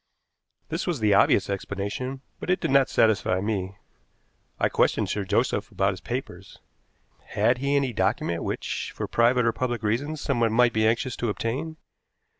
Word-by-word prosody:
This - - -3
was 170 -6 -1
the 105 -2 +3
obvious 100 0 +4
explanation, 100 +7 -4 0.2
but - - -7
it 180 - +2
did - - -2
not 135 -1 +4
satisfy 105 -4 +2
me. 100 -1 -3 0.8
I - - +3
questioned - - +1
Sir 105 - -1
Joseph 95 - 0
about 95 +1 +1
his 95 - -10
papers. 100 -6 -6 0.7
Had 120 +1 +1
he 140 +2 0
any 135 -3 +1
document 95 -4 0
which, - - -3
for - - -3
private 120 +1 +3
or 115 - +2
public 120 -3 -2
reasons, 140 +9 -1
someone 120 -6 0
might 120 0 +4
be 110 0 +2
anxious 115 +3 0
to 120 - -1
obtain? 130 - -3
115 Hz, 165 wpm, -25 LUFS, 100-130 Hz, 0.8 s, obvious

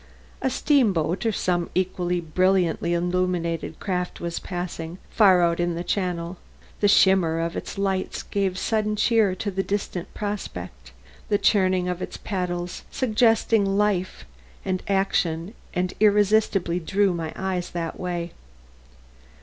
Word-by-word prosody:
A 265 - +1
steamboat 215 - +2
or - - +3
some 175 -4 0
equally 180 -1 0
brilliantly 175 0 +1
illuminated 175 -2 -1
craft 180 -2 -3
was 170 0 -3
passing, 175 -2 -5
far 190 -5 +5
out 170 0 +2
in 175 -1 0
the 170 - -3
channel; 180 -2 -2 0.4
the 205 - +3
shimmer 190 -5 +4
of 165 0 -2
its - - -6
lights 195 -1 -1
gave 195 -2 -1
sudden 215 +1 0
cheer 215 -3 +3
to 205 +2 -3
the 195 +1 -1
distant 195 -3 -3
prospect; 90 - -5 0.4
the 205 - +3
churning 185 -3 +2
of 180 0 -3
its - - -5
paddles 180 -3 -3
suggested 225 -3 +2
life 195 -2 0 0.4
and 185 -1 -1
action 190 -2 0 0.2
and 180 0 -1
irresistibly 205 -4 +3
drew 195 +3 +1
my 165 -2 -4
eyes 185 -2 -2
that 170 -2 -4
way. 175 -2 -3
185 Hz, 135 wpm, -24 LUFS, 175-200 Hz, 0.4 s, far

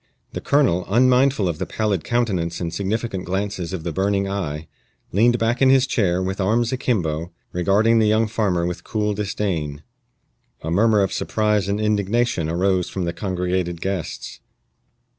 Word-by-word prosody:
The - - -4
colonel, 130 - +2
unmindful 125 -1 +3
of 85 -3 -3
the - - -3
pallid 105 -7 -1
countenance 95 -9 -1
and 85 -2 -3
significant 100 +1 -2
glances 95 -1 -3
of 95 -4 -4
the 85 - -3
burning 100 +3 0
eye, 80 -6 -4 0.4
leaned 120 +5 +3
back 115 +2 0
in 135 - +6
his 135 0 +5
chair, 95 -9 +1
with 95 +2 -2
arms 115 +5 +1
akimbo, 90 - -1 0.2
regarding 105 +6 +3
the 110 - +3
young 110 +1 +3
farmer 100 -6 0
with 90 0 -4
cool 105 -1 -1
disdain. 95 -8 -3 0.8
A 80 - -3
murmur 105 +3 +4
of 95 - -1
surprise 105 -2 0
and 100 +1 0
indignation 105 -4 0
arose 90 +1 +1
from 95 -2 -3
the 85 - -2
congregated 90 -2 -2
guests. 95 -2 -4
100 Hz, 160 wpm, -22 LUFS, 90-110 Hz, 0.8 s, in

